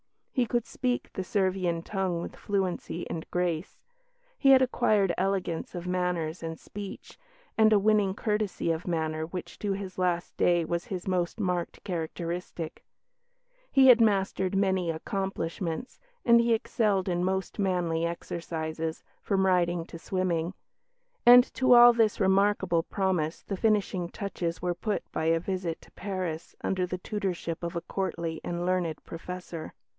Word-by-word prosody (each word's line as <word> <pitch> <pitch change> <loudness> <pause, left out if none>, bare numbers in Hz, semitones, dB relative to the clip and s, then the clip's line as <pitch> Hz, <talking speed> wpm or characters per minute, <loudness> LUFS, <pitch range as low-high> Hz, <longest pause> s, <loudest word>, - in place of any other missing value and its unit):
He 250 -2 +1
could 240 +1 0
speak 250 -1 -2
the 190 - -3
Servian 185 -4 0
tongue 190 -4 -1
with - - -7
fluency 185 -3 -2
and 160 - -5
grace; 175 -1 -2 0.6
he 275 - +3
had 265 -1 +8
acquired 210 -7 +2
elegance 190 -3 -1
of 175 0 -5
manners 180 -2 -1
and 165 -1 -5
speech, 205 - -9 0.4
and 220 0 +6
a 215 - +6
winning 205 -2 +3
courtesy 210 -5 -1
of 165 +2 -3
manner 160 -2 -1
which 180 +1 -7
to 205 -2 -1
his 190 -1 -6
last 175 -1 0
day 175 -1 +3
was 170 +1 -2
his 185 -2 -5
most 180 +2 -1
marked 180 -4 -2
characteristic; 170 -1 -4 0.9
he 270 -1 +6
had 240 -2 +8
mastered 195 -3 +2
many 190 -3 +1
accomplishments, 180 +3 -3 0.3
and 235 -1 +7
he 235 -1 +3
excelled 210 -4 0
in 175 -1 0
most 190 +2 -2
manly 175 -4 +1
exercises, 165 -1 -4 0.2
from 190 -2 +1
riding 175 -2 +2
to 165 - -10
swimming. 180 -1 -1 0.7
And 245 +1 +10
to 255 -1 +5
all 240 0 +9
this 225 -3 +2
remarkable 190 -3 +3
promise 180 -3 -1
the 195 - -4
finishing 200 -5 +1
touches 175 -4 -4
were 180 -1 +1
put 205 +4 -2
by 160 - -2
a 165 0 +3
visit 180 -2 -3
to - - -19
Paris 185 -5 -4
under 185 -1 0
the 180 - -3
tutorship 180 -4 -3
of 170 0 -4
a 170 - -1
courtly 170 -4 -3
and 175 0 -3
learned 180 -4 -1
professor. 170 -1 -7
185 Hz, 150 wpm, -28 LUFS, 170-200 Hz, 0.9 s, And